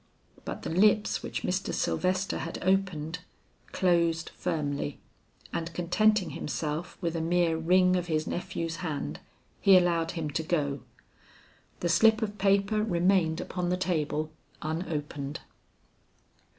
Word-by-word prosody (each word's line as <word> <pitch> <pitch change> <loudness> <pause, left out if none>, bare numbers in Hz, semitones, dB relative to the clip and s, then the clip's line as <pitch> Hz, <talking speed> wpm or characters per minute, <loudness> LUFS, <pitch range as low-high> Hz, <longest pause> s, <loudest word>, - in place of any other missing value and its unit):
But - - -5
the - - -3
lips 210 +4 +3
which - - -4
Mr. 185 +2 -1
Sylvester 185 +1 0
had 165 - -4
opened, 180 -4 0 0.5
closed 170 -3 +2
firmly, 145 -2 -2 0.5
and 165 0 -3
contenting 210 +4 +2
himself 155 +3 -4
with 170 -2 -1
a 165 - -1
mere 170 0 +2
wring 180 +3 +4
of 175 -1 -1
his 155 -2 0
nephew's 170 -2 -3
hand, 145 - -4 0.4
he 195 -1 +7
allowed 170 -2 +2
him 160 -3 -3
to 160 - -1
go. 145 -5 -1 1.0
The 175 - 0
slip 220 +6 +5
of 205 -1 -4
paper 200 +2 +3
remained 175 -4 +2
upon 180 -1 -3
the 180 - +1
table 155 -4 -1 0.3
unopened. 150 -3 -3
170 Hz, 125 wpm, -29 LUFS, 160-185 Hz, 1.0 s, he